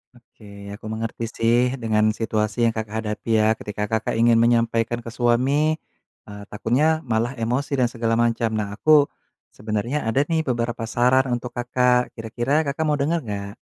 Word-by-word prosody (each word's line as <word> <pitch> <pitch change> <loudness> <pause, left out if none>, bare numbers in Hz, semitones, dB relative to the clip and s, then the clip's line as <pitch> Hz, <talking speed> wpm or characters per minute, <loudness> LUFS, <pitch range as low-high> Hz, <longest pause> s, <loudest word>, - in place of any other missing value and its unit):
Oke. 100 -4 -12
Aku 105 - -11
mengerti, 110 +1 -4
sih, 115 +1 +2 0.2
dengan 110 -3 +1
situasi 110 +1 -1
yang 115 - +2
Kakak 110 0 -4
hadapi, 105 +2 -5
ya, 110 0 +4
ketika 105 -1 -5
Kakak 110 +1 -2
ingin 115 0 +4
menyampaikan 115 0 +1
ke 115 - -6
suami, 135 +7 +2 0.5
eee, 105 0 -10
takutnya 150 +9 +1
malah 120 +2 -1
emosi 125 +5 -1
dan 125 - +3
segala 115 -2 0
macam. 115 -1 +1
Nah, 105 -1 -3
aku 150 +6 +5 0.5
sebenernya 110 +6 -2
ada, 135 +6 +2
nih, 160 +1 0
beberapa 120 -4 -2
saran 125 +3 +3
untuk 120 0 -8
Kakak. 125 0 +1
Kira-kira 120 +7 -1
Kakak 145 +3 -2
mau 150 - +2
denger 160 +4 0
nggak? 100 -4 -5
115 Hz, 165 wpm, -22 LUFS, 110-125 Hz, 0.5 s, aku